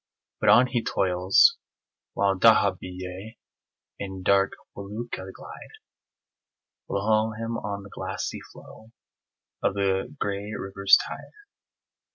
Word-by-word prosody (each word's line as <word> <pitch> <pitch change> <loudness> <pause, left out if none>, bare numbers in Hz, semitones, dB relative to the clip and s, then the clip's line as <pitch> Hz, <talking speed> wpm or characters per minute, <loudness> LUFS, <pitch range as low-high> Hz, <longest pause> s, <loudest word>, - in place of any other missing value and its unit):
But - - +2
on 125 +2 +7
he 125 -2 -2
toils 90 0 +3 0.6
while 100 0 +2
dahabiyeh 95 0 +1 0.6
And 95 -2 -6
dark 100 0 +3 0.2
felucca 100 -1 -7
glide - - -12 1.1
Below 110 +2 +1
him 115 +1 -4
on 100 -3 -5
the 100 - -13
glassy - - -5
flow 110 +1 -15 0.7
Of 95 - 0
the 100 +6 -1
gray 100 +1 -3
river's 100 0 +4
tide. - - -9
100 Hz, 105 wpm, -26 LUFS, 95-110 Hz, 1.1 s, on